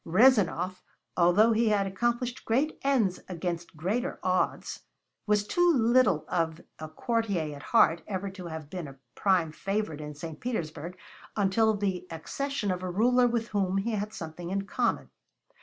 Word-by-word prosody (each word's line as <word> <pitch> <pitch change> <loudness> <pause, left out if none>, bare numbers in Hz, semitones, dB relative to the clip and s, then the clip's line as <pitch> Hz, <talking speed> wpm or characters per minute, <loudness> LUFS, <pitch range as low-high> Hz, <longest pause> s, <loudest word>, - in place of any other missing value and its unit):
Rezanov, 185 -3 +3 0.3
although 185 +6 +5
he 225 0 +3
had 205 -2 +2
accomplished 240 +5 -1
great 275 +7 0
ends 235 -10 +2
against 170 -2 -4
greater 225 - -1
odds, 185 0 0 0.5
was 210 -1 +2
too 350 +9 +3
little 235 - +3
of 165 -2 -1 0.2
a 155 0 -6
courtier 190 -5 -1
at 140 - -10
heart 165 +4 +4
ever 195 -1 -3
to 185 -2 -8
have 160 -2 -7
been 180 -5 -5
a 135 0 -12 0.2
prime 185 -5 +2
favorite 195 -3 -3
in 150 0 -7
St. 155 0 -7
Petersburg 170 -7 -4 0.4
until 215 +2 +3
the 190 -3 -2
accession 210 - -3
of 180 0 -3
a 185 - -3
ruler 245 +6 +4
with 235 -1 -1
whom 195 -2 0
he 210 +4 -1
had 210 0 -2
something 170 0 -7
in 195 +1 -1
common. 195 - -1
195 Hz, 155 wpm, -28 LUFS, 170-225 Hz, 0.5 s, although